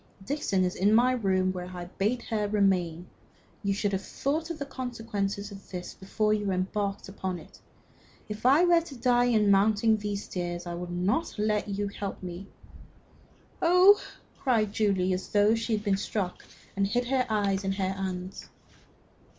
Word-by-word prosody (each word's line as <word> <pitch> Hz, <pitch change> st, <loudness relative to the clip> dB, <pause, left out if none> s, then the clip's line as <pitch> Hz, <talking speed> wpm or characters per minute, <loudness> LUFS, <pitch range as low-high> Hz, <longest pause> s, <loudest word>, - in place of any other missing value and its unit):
"Dixon 210 Hz, -8 st, 0 dB
is 180 Hz, 0 st, 0 dB
in 205 Hz, +3 st, +3 dB
my 245 Hz, +2 st, +5 dB
room, 190 Hz, -6 st, +1 dB
where 180 Hz, -1 st, -5 dB
I 180 Hz, -1 st, -7 dB
bade 210 Hz, +7 st, -1 dB
her 210 Hz, -2 st, -1 dB
remain. 185 Hz, -5 st, +1 dB, 0.6 s
You 200 Hz, -, 0 dB
should 205 Hz, 0 st, 0 dB
have 195 Hz, -1 st, -1 dB
thought 310 Hz, -, -2 dB
of 335 Hz, -, -4 dB
the 280 Hz, -, -4 dB
consequences 225 Hz, -6 st, -4 dB
of 195 Hz, -1 st, -12 dB
this 180 Hz, -1 st, -6 dB
before 210 Hz, +2 st, 0 dB
you 210 Hz, -2 st, -1 dB
embarked 195 Hz, +2 st, -2 dB
upon 190 Hz, -2 st, -4 dB
it. 160 Hz, -, -14 dB, 0.7 s
If 210 Hz, 0 st, -7 dB
I 280 Hz, +8 st, +6 dB
were 345 Hz, -1 st, +5 dB
to 325 Hz, -4 st, -10 dB
die 245 Hz, 0 st, +3 dB
in 215 Hz, -4 st, +3 dB
mounting 215 Hz, +2 st, +4 dB
these 205 Hz, -1 st, -3 dB
stairs, 175 Hz, -1 st, -4 dB
I 175 Hz, -, -4 dB
would 175 Hz, +1 st, -5 dB
not 190 Hz, -, -1 dB
let 210 Hz, 0 st, 0 dB
you 200 Hz, +1 st, -1 dB
help 200 Hz, -1 st, -6 dB
me." 180 Hz, +2 st, -7 dB, 1.1 s
"Oh!" 360 Hz, +4 st, +6 dB, 0.4 s
cried 220 Hz, -6 st, +1 dB
Julie, 190 Hz, -4 st, +1 dB
as 185 Hz, +1 st, -4 dB
though 205 Hz, +1 st, +4 dB
she 225 Hz, 0 st, -1 dB
had 210 Hz, -1 st, -1 dB
been 200 Hz, -2 st, +2 dB
struck, 195 Hz, -2 st, -3 dB, 0.3 s
and 195 Hz, 0 st, +1 dB
hid 245 Hz, +4 st, 0 dB
her 260 Hz, -2 st, +1 dB
eyes 200 Hz, -3 st, +1 dB
with 195 Hz, -1 st, -1 dB
her 190 Hz, -1 st, -1 dB
hand. 190 Hz, -1 st, -5 dB
205 Hz, 175 wpm, -28 LUFS, 190-225 Hz, 1.1 s, I